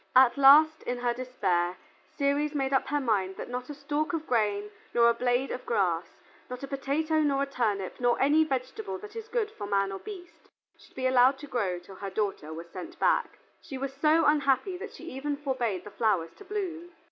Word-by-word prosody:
At 255 -1 +7
last, 300 +3 +7
in 245 - -3
her 245 -1 0
despair, 190 -8 -1 0.4
Ceres 290 +1 +1
made 270 -1 0
up 265 - +2
her 290 +1 0
mind 200 -7 0
that - - -7
not 250 +2 -4
a 295 - -6
stalk 290 +2 -2
of 320 -1 -2
grain, 210 -4 0 0.2
nor 235 0 +6
a - - +4
blade 245 +2 0
of 255 - -5
grass, 180 -7 +1 0.4
not 250 +2 -7
a - - -4
potato, 290 +4 0
nor 280 -2 +2
a - - 0
turnip, 215 -8 -2
nor 245 -1 +2
any 295 +4 +5
vegetable 315 - -3
that 420 +3 -11
is 450 -1 -6
good 450 -2 -1
for 205 - -7
man 195 -1 +1
or 195 - -5
beast, 365 -5 -11 0.3
should - - -21
be 260 - -3
allowed 255 +1 +5
to 290 - -9
grow 210 -10 -1
till 180 +2 -12
her 200 - -5
daughter 195 -7 -2
was 165 +2 -7
sent 345 +2 -8
back. - - +1 0.2
She 270 - -7
was 270 +1 -4
so 305 +4 +3
unhappy 290 +4 +2
that - - -7
she - - -13
even 285 +2 -3
forbade 245 -10 -2
the 210 - -10
flowers 195 -7 0
to 410 - -13
bloom. 355 -4 -4
265 Hz, 210 wpm, -28 LUFS, 215-300 Hz, 0.4 s, At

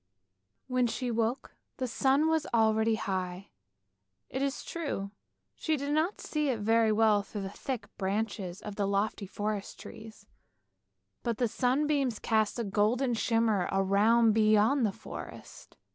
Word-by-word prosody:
When 255 -1 +1
she 245 +1 -3
woke 230 +3 -1 0.2
the 255 - -2
sun 270 +5 +2
was 320 -1 +1
already 220 0 +3
high; 185 -3 -4 0.8
it 265 - -2
is 275 0 -2
true 285 -12 -4 0.4
she 315 -1 -1
could 280 +1 -3
not 315 +7 +1
see 300 -2 -1
it 240 -4 -1
very 225 +1 +3
well 215 -1 +4
through 205 0 -6
the 195 - -5
thick 255 +2 -5
branches 200 -2 -2
of 210 -1 -7
the 200 -1 0
lofty 200 0 -1
forest 205 +1 -4
trees, 220 -2 -11 1.0
but 235 -2 -2
the 245 - +2
sunbeams 270 +1 +1
cast 220 0 +1
a 235 - -1
golden 220 +5 +1
shimmer 225 -4 +1
around 210 +4 +4
beyond 215 +4 +4
the - - -2
forest. - - -10
225 Hz, 145 wpm, -30 LUFS, 205-255 Hz, 1.0 s, well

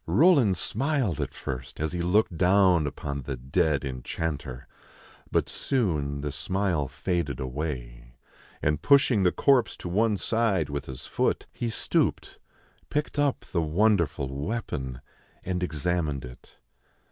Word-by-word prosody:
Roland 140 - +5
smiled 130 - 0
at - - -3
first, 65 -2 -6
as 80 +1 -1
he 90 -1 -2
looked 90 +1 +2
down 90 -2 +4
upon 70 0 -4
the 65 +1 -4
dead 70 +3 +1
enchanter; 65 0 -4 0.6
but - - +2
soon 75 - -1
the 75 0 -3
smile 90 -1 -1
faded 85 -5 -2
away, 60 -3 -5 0.5
and, 75 +1 +1
pushing 140 -6 +5
the 90 -2 +4
corpse 135 -5 +3
to - - -7
one 105 +4 +2
side 100 -9 +1
with 70 -1 -3
his 65 -1 -7
foot, - - 0
he 120 - -2
stooped, - - -1 0.5
picked 150 0 -2
up 145 -2 +2
the 85 - +1
won 100 +8 +3
derful 80 -6 -1 0.2
weapon, 70 - -4 0.4
and 90 0 -2
examined 80 -4 -1
it. 60 0 -13
85 Hz, 135 wpm, -27 LUFS, 70-105 Hz, 0.6 s, Roland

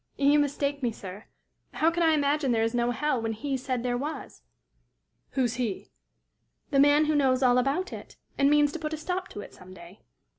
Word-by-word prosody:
"You 285 +1 +4
mistake 285 0 -1
me, 240 -2 0
sir. 200 -1 -10 0.5
How 325 +2 +2
can 345 +1 -2
I 325 -1 +4
imagine 285 -2 +1
there 225 -1 +2
is 225 +1 -1
no 240 0 +1
hell, 260 +1 -1
when 225 0 -2
he 270 +5 -3
said 255 -2 -3
there 245 -1 -1
was?" 295 +4 -6 0.9
"Who's 250 -3 0
he?" 230 -6 -4 0.8
"The 275 - +3
man 290 +2 +5
who 310 - +1
knows 265 -3 +2
all 250 0 +4
about 275 +9 -1
it, - - -10 0.2
and 275 0 +3
means 295 0 +4
to 335 - -6
put 305 0 -4
a - - -3
stop 360 +4 -3
to 205 - -8
it - - -12
some 185 0 -14
day." 175 +3 -14
275 Hz, 210 wpm, -27 LUFS, 240-295 Hz, 0.9 s, man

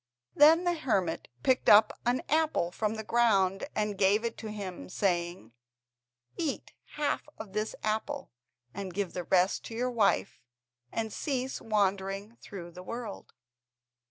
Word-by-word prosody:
Then 315 +4 +7
the 350 -1 +2
hermit 200 - -1 0.2
picked 260 - +3
up 215 +1 +7
an 245 +1 +1
apple 310 - +1
from 215 +3 -1
the 220 - -5
ground, 200 -5 +2
and 210 -2 -1
gave 205 +4 +3
it 230 - -2
to 220 - -6
him, 195 -4 -6
saying: 175 - -1 0.8
"Eat 320 -5 -3 0.2
half 295 0 -1
of 210 -3 -9
this 215 +1 -2
apple, 215 0 -2 0.4
and 190 -2 -6
give 200 -3 -2
the 180 -1 -4
rest 185 +2 +2
to 225 - -7
your 250 +2 0
wife, 210 -3 +1 0.5
and 220 -1 -3
cease 265 -2 -2
wandering 200 0 0
through 175 -4 -9
the 180 +1 -10
world." 230 +2 -7
210 Hz, 145 wpm, -30 LUFS, 190-240 Hz, 0.8 s, Then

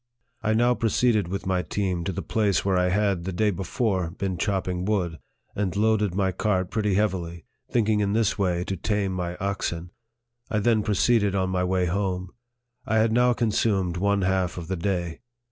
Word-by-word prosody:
I 110 -1 +1
now 120 +2 +4
proceeded 115 -3 +2
with 100 +3 -4
my 95 -1 +1
team 90 0 -2
to 95 - -1
the 85 - -4
place 105 -5 +1
where 95 -1 +2
I 90 0 +2
had, 100 -2 +1
the 95 - -3
day 105 +4 +1
before, 95 0 -1
been 95 +2 -3
chopping 90 -1 -1
wood, 90 -5 -1 0.4
and 100 -3 -1
loaded 105 -3 +2
my 95 -1 +1
cart 95 -1 0
pretty 105 -3 0
heavily, 90 -5 -1 0.2
thinking 110 -2 +2
in 100 -1 +1
this 115 0 +2
way 90 -4 0
to 95 - -3
tame 100 +1 -1
my 90 -1 -3
oxen. 90 -3 -3 0.6
I 105 - 0
then 110 +1 +3
proceeded 105 0 +2
on 95 -1 0
my 90 -1 0
way 90 0 +1
home. 90 0 -2 0.5
I 110 -1 0
had 110 0 +3
now 125 +2 +4
consumed 105 -6 +1
one 100 +1 +1
half 95 -1 0
of 85 -1 -6
the 95 - 0
day. 85 -2 -2
95 Hz, 185 wpm, -25 LUFS, 90-105 Hz, 0.6 s, now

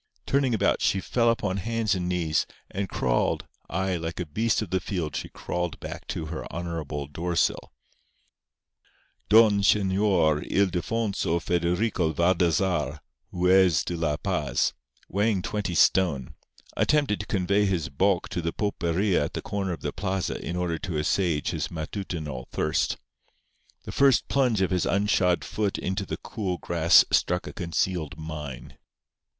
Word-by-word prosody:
Turning 135 -2 +2
about, 100 -2 +1
she 100 - +2
fell 115 +5 +1
upon 105 -5 0
hands 115 +1 0
and 90 -2 -2
knees, 85 -4 0 0.2
and 95 0 -3
crawled—ay, 90 +8 -1
like 80 +1 -5
a 90 - -2
beast 110 +9 0
of 100 - -9
the 95 - +2
field 85 -4 -3
she - - -4
crawled 90 -2 -4
back - - -8
to - - -4
her - - -6
honourable 80 -4 -4
door 85 +5 -4
sill. 80 - 0 1.6
Don 105 -1 +6
Señor 95 -6 +3
Ildefonso 100 -1 0
Federico 85 +1 0
Valdazar, 85 -1 +1 0.3
Juez 90 -2 +4
de 90 - -3
la 80 -3 0
Paz, - - 0 0.3
weighing 100 -1 +1
twenty 105 -4 -2
stone, 70 -3 +3 0.4
attempted 145 -9 +2
to 100 - -6
convey 100 +2 +1
his 85 -5 -1
bulk 90 +5 +1
to 90 -4 -3
the 85 0 -1
pulperia 90 -3 0
at - - -7
the - - -3
corner 100 -2 -2
of 80 -4 -5
the 75 - -3
plaza 95 +1 -2
in 85 - -4
order 85 -2 -1
to 85 -4 -3
assuage 80 0 0
his - - -3
matutinal 80 -5 -5
thirst. - - 0 0.9
The - - -7
first 140 -3 +4
plunge 125 -7 +2
of 95 - 0
his 90 -1 +1
unshod 95 -3 +2
foot 105 -2 -1
into 95 +1 -3
the - - -3
cool 95 -5 -4
grass 85 0 +5
struck 90 +1 +2
a - - -7
concealed 85 -3 -2
mine. 75 -4 -7
90 Hz, 145 wpm, -26 LUFS, 80-100 Hz, 1.6 s, Don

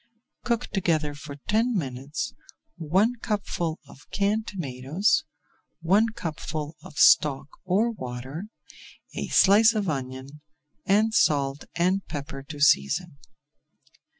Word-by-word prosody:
Cook 240 0 0
together 160 -6 0
for 145 0 -9
ten 230 +3 +2
minutes 135 -1 -4 0.4
one 190 +10 +1
cupful 175 -6 -2
of 145 - -17
canned 205 +3 0
tomatoes, 175 - 0 0.5
one 195 +7 +3
cupful 155 -5 -5
of 145 - -13
stock 140 -2 +5 0.2
or 205 +6 +2
water, 130 - -6 0.7
a - - -4
slice 220 +4 +5
of 210 -2 -1
onion, 135 +1 -5 0.5
and 215 +3 +3
salt 140 -6 +2
and 185 +3 +1
pepper 140 -2 -6
to 145 +2 -10
season. 140 - +2
160 Hz, 110 wpm, -26 LUFS, 140-205 Hz, 0.7 s, stock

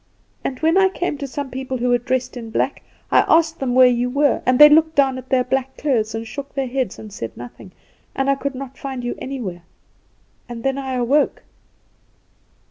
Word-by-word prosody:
"And 260 - -3
when 325 +4 +3
I 380 0 +4
came 355 -6 -3
to 280 - -4
some 275 0 -5
people 260 0 -4
who 250 +1 -1
were 245 0 +3
dressed 255 +1 -2
in 230 -2 -7
black, - - -1 0.3
I - - +6
asked 320 0 +3
them 250 -2 -1
where 255 0 +8
you 245 0 +2
were, 280 +1 +2
and 255 0 +4
they 295 - +11
looked 315 +1 +4
down 270 -2 +2
at 255 +1 -13
their 260 -2 +3
black 265 +1 -2
clothes, 225 -7 0
and 225 0 -5
shook 280 +4 -8
their 275 -1 0
heads, 255 -4 -2
and 215 -2 -10
said 115 - -7
nothing; 120 +10 -11 0.4
and 270 0 0
I 275 - +4
could 275 0 -4
not 270 0 -8
find 265 -3 -5
you 240 - -2
anywhere. 230 -10 -5 0.9
And 235 -1 -7
then 270 0 0
I 265 -1 -4
awoke. 255 +4 +1
260 Hz, 210 wpm, -20 LUFS, 245-280 Hz, 0.9 s, they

